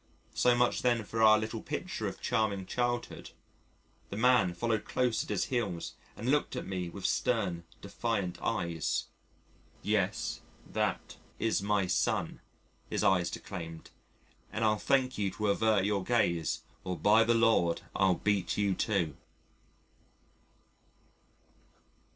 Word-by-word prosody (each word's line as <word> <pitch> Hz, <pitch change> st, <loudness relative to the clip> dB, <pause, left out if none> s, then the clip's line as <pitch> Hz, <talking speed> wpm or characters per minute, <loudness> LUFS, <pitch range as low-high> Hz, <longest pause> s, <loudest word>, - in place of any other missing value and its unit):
So 125 Hz, -1 st, +4 dB
much 120 Hz, 0 st, +2 dB
then 120 Hz, -3 st, +2 dB
for 110 Hz, +2 st, -3 dB
our 110 Hz, -1 st, +8 dB
little 110 Hz, +1 st, -3 dB
picture -, -, -4 dB
of -, -, -6 dB
charming 110 Hz, -5 st, 0 dB
childhood! 120 Hz, +3 st, -2 dB, 0.8 s
The 100 Hz, -, -5 dB
man 120 Hz, -7 st, +4 dB
followed 110 Hz, +4 st, 0 dB
close 125 Hz, -3 st, 0 dB
at -, -, -12 dB
his -, -, 0 dB
heels 105 Hz, -10 st, -2 dB, 0.2 s
and 120 Hz, +4 st, -1 dB
looked 145 Hz, 0 st, +1 dB
at -, -, -4 dB
me 90 Hz, -2 st, -3 dB
with 95 Hz, +2 st, -8 dB
stern 95 Hz, -8 st, 0 dB, 0.2 s
defiant 105 Hz, -7 st, -2 dB
eyes. 85 Hz, -2 st, -1 dB, 0.8 s
"Yes, 95 Hz, -7 st, 0 dB, 0.2 s
that -, -, -2 dB, 0.2 s
is 115 Hz, -3 st, +1 dB
my 100 Hz, -1 st, +1 dB
son," 90 Hz, -, 0 dB, 0.5 s
his -, -, -1 dB
eyes 90 Hz, -3 st, +3 dB
declaimed, 80 Hz, -2 st, -7 dB, 0.6 s
"and 110 Hz, 0 st, -1 dB
I'll 105 Hz, -1 st, +2 dB
thank 130 Hz, -2 st, +1 dB
you 100 Hz, -2 st, +1 dB
to 105 Hz, 0 st, -1 dB
avert 105 Hz, -1 st, +3 dB
your 100 Hz, -2 st, 0 dB
gaze 85 Hz, -8 st, +1 dB, 0.2 s
or 90 Hz, -1 st, -3 dB
by 110 Hz, +5 st, +5 dB
the 115 Hz, +1 st, +3 dB
Lord 115 Hz, -7 st, +3 dB
I'll 95 Hz, -2 st, +3 dB
beat 100 Hz, -1 st, 0 dB
you 100 Hz, -2 st, +2 dB
too." 90 Hz, -6 st, 0 dB
105 Hz, 135 wpm, -31 LUFS, 90-115 Hz, 0.8 s, our